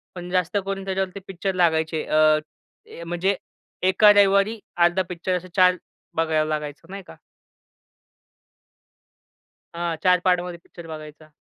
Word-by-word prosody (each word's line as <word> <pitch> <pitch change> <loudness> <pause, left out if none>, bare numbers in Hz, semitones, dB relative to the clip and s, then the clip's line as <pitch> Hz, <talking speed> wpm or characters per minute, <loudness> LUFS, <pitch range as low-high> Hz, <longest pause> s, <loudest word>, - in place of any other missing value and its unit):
पण 175 0 -7
जास्त 180 +1 0
करून 195 0 -4
त्याच्यावरती 190 0 -3
पिक्चर 195 +1 -3
लागायचे, 160 -2 +1
अ, 155 0 +4 0.5
ए 170 - -11
म्हणजे 175 +3 -1 0.5
एका 210 +2 +6
रविवारी 200 +2 +3 0.2
अर्धा 175 +2 +3
पिक्चर 180 +1 -2
असे 180 +1 -9
4 180 -1 +5 0.4
बघावं 160 -1 +1
लागायचं 150 +2 -5
नाही 195 -1 -7
का? - - -12 2.6
हां. 170 -1 -2
4 180 -1 +4
पार्टमध्ये 180 -1 +1
पिक्चर 170 -2 -13
बघायचा. 155 0 -10
175 Hz, 125 wpm, -23 LUFS, 160-190 Hz, 2.6 s, एका